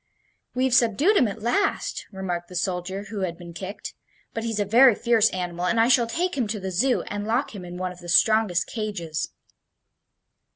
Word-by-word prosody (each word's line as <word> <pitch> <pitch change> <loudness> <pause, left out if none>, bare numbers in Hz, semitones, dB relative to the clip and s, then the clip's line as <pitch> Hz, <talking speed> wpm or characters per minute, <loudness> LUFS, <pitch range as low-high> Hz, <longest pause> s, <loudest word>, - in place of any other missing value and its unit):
"We've 255 0 +1
subdued 245 - +4
him 255 - +4
at 210 +1 -7
last," 395 - 0
remarked 180 -3 -4
the 180 - -10
soldier 185 +1 -2
who 210 - -4
had 175 -3 -3
been 175 -1 -10
kicked. 190 +4 -7 0.4
"But 225 - -3
he's 225 -2 -2
a 205 - +1
very 240 +3 +6
fierce 230 -2 +3
animal, 180 -1 -3
and 225 - +1
I 230 +2 +4
shall 245 -2 +4
take 350 +9 -1
him 250 -5 0
to 210 0 -3
the 190 0 -4
Zoo 250 +9 +1
and 205 0 -5
lock 235 +5 0
him 195 -3 -8
in 175 0 -8
one 185 0 -3
of 180 - -12
the 175 -1 -9
strongest 215 -2 +3
cages." 200 -8 -4
205 Hz, 200 wpm, -24 LUFS, 180-235 Hz, 0.4 s, very